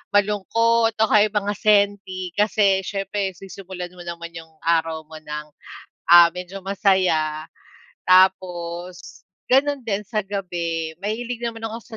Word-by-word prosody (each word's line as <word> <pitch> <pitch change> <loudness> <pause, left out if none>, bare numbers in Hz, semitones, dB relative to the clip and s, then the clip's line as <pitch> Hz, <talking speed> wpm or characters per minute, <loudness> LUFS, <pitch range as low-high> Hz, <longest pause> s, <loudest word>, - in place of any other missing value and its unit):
malungkot 225 +3 +2
o 220 0 +2
kaya 210 0 +5
mga 205 -1 -1
senti 200 -3 +1
kasi 200 0 +2
siyempre 195 0 -3
sisimulan 190 -1 -9
mo 175 -1 -12
naman 170 0 -6
yung 165 -1 -12
araw 165 -1 0
mo 155 0 -12
ng, 150 0 -7 0.6
ah, 170 -1 +8
medyo 180 +2 -8
masaya. 185 -6 +1 0.6
Tapos 180 -1 +1 0.2
gano'n 280 +2 +3
din 210 -4 -3
sa 215 +1 -2
gabi, 175 -5 -4
mahilig 230 +4 -4
naman 230 -1 -5
ako 225 +1 -7
190 Hz, 125 wpm, -22 LUFS, 170-210 Hz, 0.6 s, ah